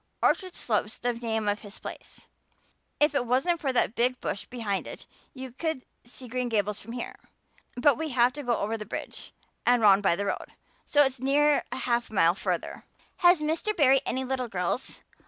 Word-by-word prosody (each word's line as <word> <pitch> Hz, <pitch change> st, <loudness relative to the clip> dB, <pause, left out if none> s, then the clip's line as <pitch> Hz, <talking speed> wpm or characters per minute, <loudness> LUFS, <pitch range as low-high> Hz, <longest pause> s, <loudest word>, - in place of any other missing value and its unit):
Orchard 370 Hz, -2 st, +2 dB
Slope's 215 Hz, -1 st, -1 dB
the 245 Hz, 0 st, -1 dB
name 225 Hz, -2 st, -2 dB
of 205 Hz, 0 st, +1 dB
his 205 Hz, -1 st, -10 dB
place. -, -, -10 dB, 0.7 s
If 295 Hz, 0 st, +4 dB
it 250 Hz, -4 st, 0 dB
wasn't 325 Hz, +8 st, +2 dB
for 275 Hz, -, 0 dB
that 245 Hz, -3 st, +2 dB
big 250 Hz, +1 st, +1 dB
bush 195 Hz, -, -4 dB
behind 215 Hz, -6 st, -3 dB
it -, -, -9 dB, 0.3 s
you 260 Hz, -1 st, -7 dB
could 295 Hz, +1 st, -3 dB, 0.2 s
see 250 Hz, +1 st, -11 dB
Green 250 Hz, +1 st, -2 dB
Gables 210 Hz, -2 st, 0 dB
from 230 Hz, +3 st, -9 dB
here. 245 Hz, -, -5 dB, 0.6 s
But 275 Hz, +3 st, +3 dB
we 320 Hz, -1 st, -2 dB
have 245 Hz, -1 st, +3 dB
to 290 Hz, -, -6 dB
go 245 Hz, -4 st, 0 dB
over 220 Hz, +2 st, -2 dB
the -, -, -4 dB
bridge -, -, -7 dB, 0.3 s
and 245 Hz, 0 st, +4 dB
round 205 Hz, -2 st, +6 dB
by 190 Hz, -4 st, +3 dB
the 200 Hz, +3 st, -3 dB
road, -, -, -4 dB, 0.3 s
so 290 Hz, 0 st, +5 dB
it's 265 Hz, -2 st, -1 dB
near 290 Hz, +3 st, +3 dB
half 240 Hz, -2 st, -1 dB
a 220 Hz, -, -10 dB
mile 170 Hz, -2 st, +5 dB
further." 195 Hz, -, -3 dB, 0.3 s
"Has 350 Hz, -2 st, +5 dB
Mr. 320 Hz, +8 st, -1 dB
Barry 270 Hz, -3 st, +5 dB
any 260 Hz, -1 st, -2 dB
little 255 Hz, -1 st, -2 dB
girls? 190 Hz, +5 st, -3 dB
245 Hz, 190 wpm, -27 LUFS, 220-275 Hz, 0.7 s, round